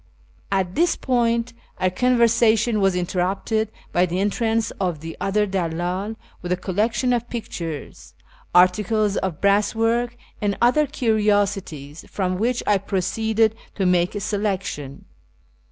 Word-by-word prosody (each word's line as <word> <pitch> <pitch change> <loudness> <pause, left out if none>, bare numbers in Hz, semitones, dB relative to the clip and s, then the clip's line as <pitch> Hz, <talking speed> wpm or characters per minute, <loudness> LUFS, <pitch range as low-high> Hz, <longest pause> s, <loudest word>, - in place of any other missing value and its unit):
At 190 -2 0
this 340 - +2
point 235 -2 0 0.2
our 185 0 +1
conversation 235 -1 +3
was 195 -2 +3
interrupted 190 +5 -1 0.2
by 180 +1 +3
the 180 +2 -2
entrance 225 +2 0
of 175 -5 -1
the 165 0 -7
other 210 +2 +1
dalldl 185 +2 -2 0.3
with 180 - -5
a 180 - +2
collection 215 +7 0
of 240 0 -2
pictures, 170 - -6 0.4
articles 200 +3 +3
of 185 -5 -2
brass 200 +2 +2
work, 235 +2 0 0.2
and 205 -1 0
other 270 +5 +4
curiosities, 205 - 0
from 185 -2 -2
which 240 +3 0
I 205 -2 +3
proceeded 220 +3 +1 0.2
to 195 - 0
make 180 +1 +2
a - - -1
selection. 195 -9 -3
205 Hz, 130 wpm, -22 LUFS, 180-225 Hz, 0.4 s, other